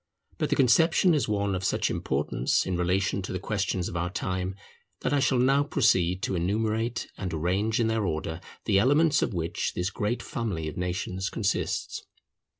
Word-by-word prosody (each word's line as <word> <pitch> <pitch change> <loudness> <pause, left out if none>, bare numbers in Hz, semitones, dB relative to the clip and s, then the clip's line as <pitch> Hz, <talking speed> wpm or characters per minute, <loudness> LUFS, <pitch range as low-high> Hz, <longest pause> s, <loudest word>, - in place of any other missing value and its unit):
But - - 0
the - - +2
conception 165 +7 +4
is 150 - +1
one 100 -2 0
of 95 0 -3
such - - +1
importance 70 +3 0
in 95 - -1
relation 95 +3 0
to 95 - -6
the 95 - -2
questions 95 -2 -1
of - - -7
our 85 +1 -1
time, 95 0 -3 0.5
that - - 0
I 145 - +3
shall 130 -1 +2
now 135 +3 +4
proceed 95 - +2
to - - -1
enumerate 110 +6 -1
and 95 -3 -3
arrange 95 +8 0
in 115 - +3
their 110 -1 0
order 80 -1 -3 0.2
the 100 -3 +4
elements 145 +7 +4
of 100 - -1
which 85 0 -2
this 90 +2 -1
great 110 +3 -2
family 100 -10 -3
of 75 - -5
nations 90 +2 -2
consists. 100 -3 -2
100 Hz, 180 wpm, -27 LUFS, 90-115 Hz, 0.5 s, conception